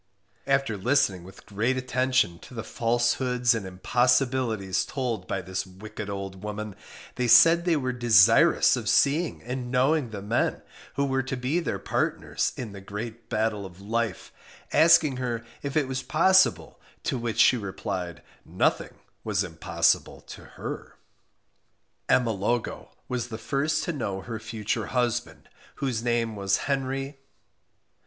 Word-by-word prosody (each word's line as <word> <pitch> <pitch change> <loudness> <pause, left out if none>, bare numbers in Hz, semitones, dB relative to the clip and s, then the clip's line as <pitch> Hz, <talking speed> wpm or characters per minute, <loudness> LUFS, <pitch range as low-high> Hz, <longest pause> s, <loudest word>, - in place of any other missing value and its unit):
After 135 -6 +1
listening 100 -5 +1
with 95 +2 -14
great 115 +5 -1
attention 130 -8 +1
to 125 - -13
the 115 - -4
falsehoods 120 +1 +1
and 110 -5 -4
impossibilities 120 0 +1
told 125 -6 -3
by 95 -1 -3
this 95 +1 -3
wicked 100 +2 -8
old 95 -1 -6
woman, 105 -1 -5 0.4
they 125 -1 0
said 165 +8 +7
they 175 -2 +3
were 130 -4 -1
desirous 120 -6 +5
of - - -3
seeing 155 +4 +2
and 125 +1 -5
knowing 130 +2 +2
the 100 -3 -7
men 110 +4 0 0.3
who 140 - +1
were 135 -1 0
to 130 0 -4
be 130 +7 0
their 170 - -2
partners - - -1
in 120 -5 -5
the 100 -1 -10
great 110 +4 -7
battle 110 -2 -1
of 95 -1 -11
life, 110 +1 -3 0.4
asking 160 -5 +5
her 120 -3 -3 0.2
if 140 +2 -3
it 145 -3 +2
was 130 0 -3
possible, 190 +7 +3 0.2
to - - -1
which 120 -2 -3
she - - +6
replied, 95 -4 -5 0.2
nothing - - 0 0.3
was - - 0
impossible - - 0
to - - -11
her. - - -6 1.1
Emma 120 -3 +3
Logo 110 +4 -2 0.2
was 125 -1 -3
the 110 -2 -6
first 150 +5 -1
to 170 - -2
know 100 -9 -3
her 115 +2 -6
future 110 0 -3
husband, 120 -1 -2 0.3
whose 130 -5 -2
name 120 -2 0
was 100 -1 +1
Henry 135 0 -2
120 Hz, 145 wpm, -26 LUFS, 105-130 Hz, 1.1 s, said